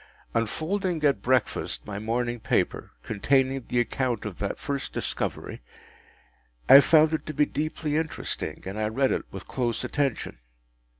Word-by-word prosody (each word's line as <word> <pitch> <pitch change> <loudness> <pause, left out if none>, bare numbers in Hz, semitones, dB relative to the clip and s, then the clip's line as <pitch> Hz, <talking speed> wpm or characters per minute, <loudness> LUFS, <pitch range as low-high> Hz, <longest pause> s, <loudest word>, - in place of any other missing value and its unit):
Unfolding 160 - -1
at 140 -2 +3
breakfast 130 -2 0
my 100 -1 -5
morning 120 +2 -1
paper, - - -1
containing 130 +4 +1
the 125 - +1
account 120 -2 -1
of 105 -5 -6
that 100 - -2
first 140 -1 -4
discovery, - - -3 1.1
I 140 - +11
found 155 +2 +5
it 160 - -1
to 155 - -5
be 150 - +4
deeply 150 0 -2
interesting, 160 -1 -3
and 95 +3 -5
I 110 - +1
read 130 +5 +1
it - - -1
with - - -8
close 120 -3 -1
attention. 140 - -2
130 Hz, 145 wpm, -26 LUFS, 115-150 Hz, 1.1 s, I